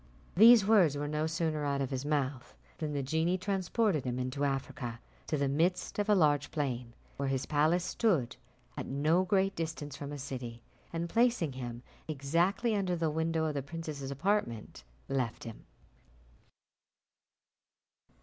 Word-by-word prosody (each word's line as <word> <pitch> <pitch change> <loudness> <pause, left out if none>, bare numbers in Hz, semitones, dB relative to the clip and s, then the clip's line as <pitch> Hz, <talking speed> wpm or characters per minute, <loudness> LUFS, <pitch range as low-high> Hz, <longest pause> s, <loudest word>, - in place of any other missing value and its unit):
These 225 +2 +8
words 190 -9 +5
were 145 +1 -2
no 150 +1 -1
sooner 160 -2 -1
out 140 -1 0
of 135 -1 -2
his 130 +1 -3
mouth, 140 -3 -2 0.2
than 155 -2 -2
the 140 -1 -1
genie 160 +6 +1
transported 190 - 0
him 125 -1 -2
into 130 +3 -2
Africa, 135 -3 -3 0.3
to 155 - 0
the 140 0 +1
midst 165 +9 0
of 205 +1 0
a 210 - +6
large 150 -5 +3
plain, 125 -6 -3 0.2
where 140 -1 -1
his 135 -1 -1
palace 155 +4 +2
stood, 175 - +1 0.4
at - - -5
no 155 +6 +2
great 195 +1 +1
distance 160 -3 -4
from 140 0 -6
a 145 - -5
city, 125 -4 -6 0.3
and 170 0 -2
placing 230 - +2
him 120 -2 -6 0.2
exactly 170 - +1
under 190 -3 0
the 165 -2 0
window 160 +1 0
of 155 - -1
the 140 - -2
princess's 150 -2 -6
apartment, 140 - -1 0.2
left 130 -4 -2
him. 115 -1 -9
150 Hz, 155 wpm, -31 LUFS, 135-175 Hz, 0.4 s, These